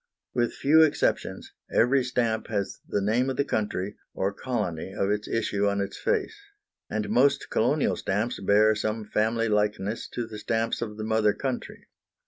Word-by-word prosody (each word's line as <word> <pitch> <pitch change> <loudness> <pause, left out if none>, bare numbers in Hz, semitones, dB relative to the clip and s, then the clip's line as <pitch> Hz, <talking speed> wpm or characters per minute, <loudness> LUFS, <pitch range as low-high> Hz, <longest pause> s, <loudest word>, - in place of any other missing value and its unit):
With 120 -1 0
few 155 +3 +5
exceptions, 155 -2 +1 0.2
every 130 +3 +4
stamp 120 -3 0
has 100 -3 -3
the 100 - 0
name 120 +6 +2
of 130 - -3
the 140 - +2
country, 105 -4 -2 0.2
or 100 +1 0
colony, 100 -8 -3
of 100 +1 0
its 105 0 -1
issue 105 -3 0
on 100 0 0
its 100 0 -3
face; 440 -2 -1 0.5
and 105 0 -2
most 140 +3 +2
colonial 135 +6 +2
stamps 105 +5 -1
bear 105 +2 +4
some 110 +1 -2
family 115 +2 +1
likeness 105 0 0
to 120 - -2
the 110 -1 -8
stamps 115 +1 -1
of 105 -2 -4
the 110 - -4
mother 110 -1 +2
country. 130 -3 -5
110 Hz, 165 wpm, -27 LUFS, 105-125 Hz, 0.5 s, few